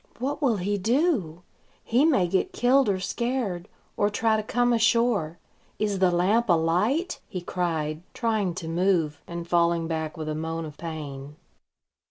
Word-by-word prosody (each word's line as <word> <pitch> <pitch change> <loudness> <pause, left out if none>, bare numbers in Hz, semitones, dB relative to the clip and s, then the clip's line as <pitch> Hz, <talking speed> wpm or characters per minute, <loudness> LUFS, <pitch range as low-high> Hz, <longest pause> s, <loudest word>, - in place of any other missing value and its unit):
"What 275 +6 -3
will 245 -7 +2
he 200 +2 -1
do? 220 - 0 0.4
He 250 +6 +3
may 230 - +3
get 185 +2 0
killed 255 -1 +3
or 190 -2 0
scared, 220 -4 -2 0.3
or 205 - +2
try 220 +1 +1
to 215 - 0
come 245 +3 +1
ashore. 225 -7 +2 0.4
Is 205 -2 -1
the 185 -1 +4
lamp 195 +6 +2
alight?" 180 - +1
he 185 - -5
cried, 165 -3 -2
trying 215 -7 0
to 170 -3 -6
move, 165 -3 +1
and 170 0 -6
falling 170 -1 +2
back 160 0 -3
with 155 -1 -5
a 155 - -1
moan 160 +1 -3
of 150 -2 -9
pain. 145 -4 -7
185 Hz, 160 wpm, -26 LUFS, 165-230 Hz, 0.4 s, the